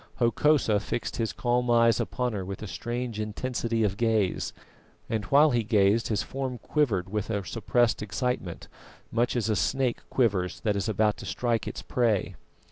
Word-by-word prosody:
Hokosa 120 -2 +3
fixed 115 - -4
his 115 -2 -1
calm 125 0 0
eyes 115 -2 +4
upon 125 -3 -1
her 100 -2 -3
with 95 +2 -6
a - - -5
strange 120 +1 -4
intensity 115 +1 -2
of 100 -1 0
gaze, 110 -5 +1 0.6
and 110 -3 -2
while 145 +7 +5
he 120 - +2
gazed 105 0 +3
his 105 -4 0
form 130 -2 -4
quivered 115 - 0
with 105 0 -2
a 100 -4 -2
suppressed 115 +2 +1
excitement, 105 -4 -3 0.4
much 120 +2 +1
as 115 -3 0
a 110 - +1
snake 130 +2 0
quivers 95 -8 +1
that 105 -2 0
is 100 +2 -1
about 105 0 +2
to - - -8
strike 120 -2 -1
its - - -6
prey. 115 -6 +1
115 Hz, 170 wpm, -27 LUFS, 105-125 Hz, 0.6 s, while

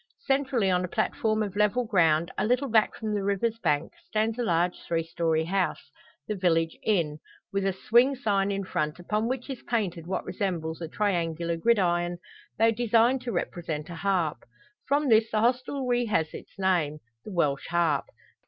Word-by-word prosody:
Centrally 270 -7 +1
on 180 0 +2
a - - -2
platform 215 +2 0
of 200 -2 -5
level 210 +4 +2
ground, 165 -5 +3
a - - -1
little 250 +5 +1
back 220 -1 +3
from 215 -1 -3
the 205 - 0
river's 210 +3 0
bank, 150 -7 0
stands 220 +2 0
a - - +1
large 175 -3 +1
three 165 -1 -1
storey 165 -1 0
house 190 +1 -1 0.4
the 215 - -1
village 165 -4 +1
inn 165 -8 0 0.3
with 195 0 0
a - - +2 0.2
swing 245 +5 +5
sign 200 -6 +1
in 200 0 -2
front, 155 -4 -2
upon 210 +5 -1
which 250 0 -3
is 265 -4 -6
painted 185 -8 -2
what 190 - -2
resembles 175 -4 -3
a 165 - -3
triangular 170 -3 -1
gridiron, 175 -3 +1 0.4
though 225 +1 +4
designed 235 +2 +3
to 250 -1 -4
represent 165 -4 -3
a - - -6
harp. 170 -5 0 0.5
From 285 +1 +2
this 220 -2 +4
the 215 - 0
hostelry 250 +1 +1
has 160 -8 0
its - - -11
name 175 -6 +1 0.3
the - - -8
"Welsh 150 -6 0
Harp!" 165 -4 +1
195 Hz, 175 wpm, -27 LUFS, 170-225 Hz, 0.5 s, swing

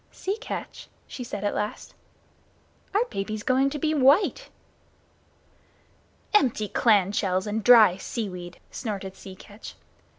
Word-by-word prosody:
"Sea 390 +2 -3
Catch," - - -7 0.2
she 250 - -8
said, 210 -4 -6
at 205 - 0
last, 210 +1 -4 1.0
"our 440 +4 +3
baby's 210 +2 -4
going 265 +1 +2
to 295 - -5
be 310 +2 0
white!" 300 - +3 1.8
"Empty 240 - +2
clam 205 -5 +3
shells 190 -2 0
and 215 +1 -3
dry 220 -6 +7
seaweed!" 180 -5 -6
snorted 195 -5 -5
Sea 190 -1 -11
Catch. 205 +3 -12
215 Hz, 125 wpm, -25 LUFS, 195-260 Hz, 1.8 s, dry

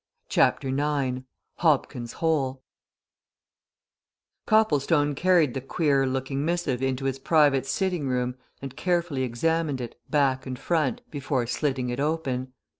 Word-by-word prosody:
CHAPTER 135 - +2
IX 135 -2 -1 0.3
HOBKIN'S 135 -7 +1
HOLE 135 -5 0 1.8
Copplestone 150 -8 +3
carried 170 -3 +3
the 135 - -3
queer 135 0 +1
looking 135 +1 -2
missive 160 -6 -1
into 135 0 -1
his 135 0 -1
private 140 -3 +3
sitting 180 -1 -1
room 125 -1 0 0.3
and 135 -1 -6
carefully 170 -4 0
examined 145 +4 0
it, 120 -2 -7
back 135 -3 +1
and 130 -1 -4
front, 155 -2 0
before 135 -3 -1
slitting 130 0 -1
it 120 +2 -3
open. 140 -4 -1
135 Hz, 120 wpm, -26 LUFS, 130-155 Hz, 1.8 s, Copplestone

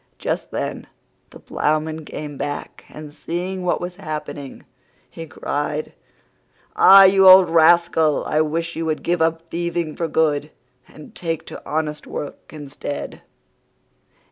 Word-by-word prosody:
Just - - -3
then - - -5 0.4
the - - -14
Ploughman 155 +1 -2
came 150 -1 -7
back, 145 +1 -6
and 150 -1 -11
seeing 180 +4 -5
what 180 -1 0
was 180 +1 -6
happening, 150 -5 -7 0.4
he 165 0 -10
cried, 145 +1 -4 0.8
"Ah, 195 0 +8
you 190 0 +6
old 185 -2 +8
rascal, 165 -2 +3
I 155 - +1
wish 165 +2 -2
you 165 0 -3
would 155 -1 -2
give 175 -1 0
up 165 0 -1
thieving 170 -2 -3
for 165 - -2
good 150 -2 0 0.4
and 155 - -14
take 165 -2 -4
to - - -10
honest 150 -1 -3
work 145 - -8
instead." 145 -1 -7
160 Hz, 135 wpm, -21 LUFS, 150-170 Hz, 0.8 s, Ah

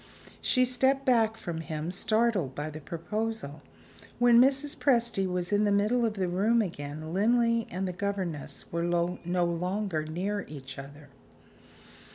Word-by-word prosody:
She 255 -1 +3
stepped 265 +2 +2
back 225 -3 +3
from 170 -6 -5
him, 160 +1 -4
startled 215 - +1
by 150 +1 -4
the 155 +1 -8
proposal. 170 -1 -4 0.6
When 240 0 +6
Mrs. 275 +2 +2
Presty 235 -7 +2
was 180 +2 -2
in 205 +1 +3
the 205 - +2
middle 215 +4 +2
of 220 -2 -1
the 190 -3 -1
room 205 +7 +2
again, 155 -2 -6
Linley 230 +3 +2
and 185 +2 -3
the 180 - -3
governess 175 -7 -4
were 170 - -1
no 175 +1 0
longer 180 0 -1
near 185 +6 -3
each 135 -3 -8
other. 145 +1 -11
190 Hz, 150 wpm, -29 LUFS, 165-225 Hz, 0.6 s, When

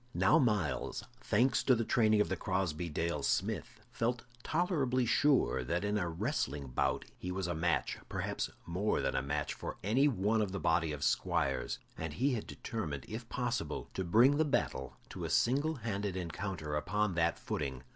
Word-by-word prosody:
Now 160 - +5
Myles, 105 - 0 0.2
thanks 125 +1 +2
to 130 - +4
the 115 -1 -1
training 110 -2 +4
of - - 0
the - - 0
Crosbey 90 -3 -1
Dale 80 0 -1
smith, - - -1
felt 120 +1 -1 0.2
tolerably 145 -7 +1
sure 135 - +3
that 85 +10 -1
in 105 +1 0
a 90 -3 -1
wrestling 80 - -2
bout 60 - 0
he 90 - -4
was 95 0 -2
a 85 - -1
match 85 +1 0
perhaps - - -2 0.2
more 90 +5 0
than - - 0
a - - +2
match 75 +2 -2
for - - -6
any 125 +9 +4
one 110 -3 +2
of 100 -3 -1
the 100 - -2
body 80 -3 +2
of 75 -1 -4
squires, 70 0 +1 0.2
and 80 -2 -3
he 130 - +1
had 115 - -3
determined, 75 - -4
if - - -6
possible, - - -2
to 95 - -2
bring 120 +11 +5
the 160 - +4
battle 65 - -1
to - - -6
a - - -2
single 145 +6 +2
handed 100 -6 -3
encounter 85 -3 -4
upon 105 +6 0
that 85 0 +1
footing. 65 -4 -4
100 Hz, 180 wpm, -33 LUFS, 80-120 Hz, 0.2 s, Now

